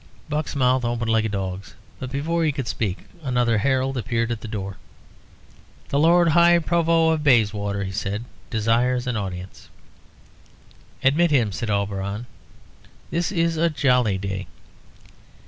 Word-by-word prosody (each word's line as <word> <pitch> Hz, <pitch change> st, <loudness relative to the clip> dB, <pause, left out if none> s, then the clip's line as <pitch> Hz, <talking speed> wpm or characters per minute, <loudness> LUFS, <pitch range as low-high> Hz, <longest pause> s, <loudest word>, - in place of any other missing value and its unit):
Buck's 150 Hz, -1 st, -2 dB
mouth 130 Hz, -1 st, +2 dB
opened 120 Hz, -1 st, -1 dB
like 110 Hz, 0 st, +2 dB
a -, -, -1 dB
dog's, 95 Hz, -1 st, -5 dB, 0.2 s
but 130 Hz, -, -5 dB
before 165 Hz, +5 st, -1 dB
he 155 Hz, -, +2 dB
could 135 Hz, -3 st, -4 dB
speak 100 Hz, -4 st, -3 dB, 0.2 s
another 125 Hz, -5 st, +1 dB
herald 130 Hz, +2 st, 0 dB
appeared 115 Hz, -1 st, -1 dB
at 115 Hz, -, -3 dB
the -, -, -7 dB
door. 100 Hz, -3 st, -5 dB, 1.1 s
"The 140 Hz, -, +1 dB
Lord 170 Hz, +2 st, +5 dB
High 170 Hz, +2 st, +6 dB
Provost 165 Hz, -1 st, +2 dB
of -, -, -6 dB
Bayswater," 105 Hz, -6 st, +2 dB
he 95 Hz, -, -4 dB
said, 105 Hz, +3 st, -3 dB, 0.2 s
"desires 120 Hz, +3 st, +1 dB
an 125 Hz, -1 st, -2 dB
audience." 95 Hz, -2 st, -6 dB, 1.3 s
"Admit 155 Hz, +6 st, +4 dB
him," 120 Hz, -8 st, +2 dB
said 115 Hz, +3 st, -4 dB
Auberon. 100 Hz, +2 st, -2 dB, 0.9 s
"This 170 Hz, +2 st, -1 dB
is 165 Hz, -3 st, +1 dB
a 170 Hz, +1 st, +3 dB
jolly 125 Hz, -9 st, +2 dB
day." 95 Hz, 0 st, -4 dB
120 Hz, 145 wpm, -23 LUFS, 105-150 Hz, 1.3 s, High